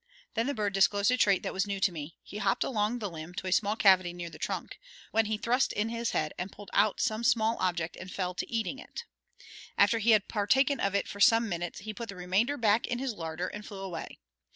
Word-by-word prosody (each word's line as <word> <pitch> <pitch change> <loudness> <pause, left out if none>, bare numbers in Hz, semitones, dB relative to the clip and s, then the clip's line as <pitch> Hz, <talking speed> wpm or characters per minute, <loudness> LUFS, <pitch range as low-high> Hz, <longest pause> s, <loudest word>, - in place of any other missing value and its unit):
Then 230 +2 0
the 285 - -1
bird 205 -3 -1
disclosed 200 +3 +3
a - - +4
trait 200 -5 +3
that - - -3
was 190 +1 0
new 200 -1 -2
to 190 - +3
me: 155 -1 -7
he 210 - -8
hopped 195 -1 +1
along 215 -1 0
the 215 -4 -3
limb 165 0 -8
to - - -5
a 185 - -2
small 205 +2 +2
cavity 185 -5 +4
near 175 -1 -6
the - - -12
trunk, - - -4 0.3
when 225 0 +3
he 215 0 -1
thrust 245 +4 +1
in 210 +2 -1
his 230 0 -2
head 155 -1 -1
and 185 +2 -4
pulled 205 0 -12
out 205 +1 +3
some 220 -2 0
small 225 -1 +3
object 175 -3 -1
and 185 - -8
fell 180 -2 -2
to - - -5
eating 230 +3 -2
it. 475 - -8 0.7
After 205 +3 +4
he 225 +2 +1
had 215 -2 +5
partaken 265 +7 +2
of 200 0 0
it 200 - 0
for 200 - -8
some 225 +3 +5
minutes 175 -3 -4
he 215 +1 -6
put 230 +2 -7
the 195 - -6
remainder 190 +10 0
back 220 -2 +2
in 245 - -2
his 260 -1 -2
larder 165 -1 -4
and 205 +2 -7
flew 205 -2 -9
away. 180 -4 -6
205 Hz, 245 wpm, -30 LUFS, 185-225 Hz, 0.7 s, had